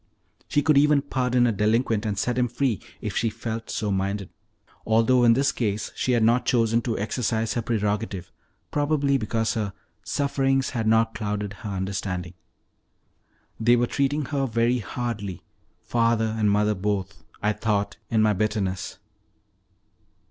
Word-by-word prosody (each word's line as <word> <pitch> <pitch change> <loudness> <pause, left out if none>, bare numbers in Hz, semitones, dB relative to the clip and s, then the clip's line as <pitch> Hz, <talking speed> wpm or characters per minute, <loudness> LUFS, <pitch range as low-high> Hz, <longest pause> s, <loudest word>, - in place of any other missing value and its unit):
She 145 - +1
could 150 -2 +5
even 145 -1 +4
pardon 125 -3 +1
a 120 - +3
delinquent 110 +1 +1
and 100 -2 -2
set 125 +4 0
him 125 0 +2
free 120 - -1 0.2
if - - -4
she 115 - +1
felt 115 +1 -5
so 105 -2 -2
minded, 100 0 -2 0.5
although 115 +3 +3
in 115 -1 +7
this 135 +3 +2
case 105 -3 -2
she 130 - 0
had 115 -2 +3
not 120 +3 +4
chosen 115 -2 +3
to 115 -2 -2
exercise 110 0 -1
her 120 - -1
prerogative, 105 -4 -2 0.4
probably 145 -2 +1
because 115 0 -1
her 105 -4 -2 0.3
"sufferings 135 -2 0
had 115 -3 -2
not 115 0 +3
clouded 105 -1 -3
her 105 - -5
understanding." 95 -2 -3 1.3
They 120 +2 +5
were 120 0 +2
treating 140 +3 0
her 135 -1 -1
very 115 +2 +1
hardly 105 -5 -4 0.4
father 115 -2 +1
and 110 -2 +2
mother 105 +1 +3
both 100 0 -3 0.2
I 105 +1 +2
thought 100 -2 -1
in 110 -1 +3
my 105 -1 +4
bitterness. 95 -2 -2
115 Hz, 150 wpm, -25 LUFS, 105-125 Hz, 1.3 s, in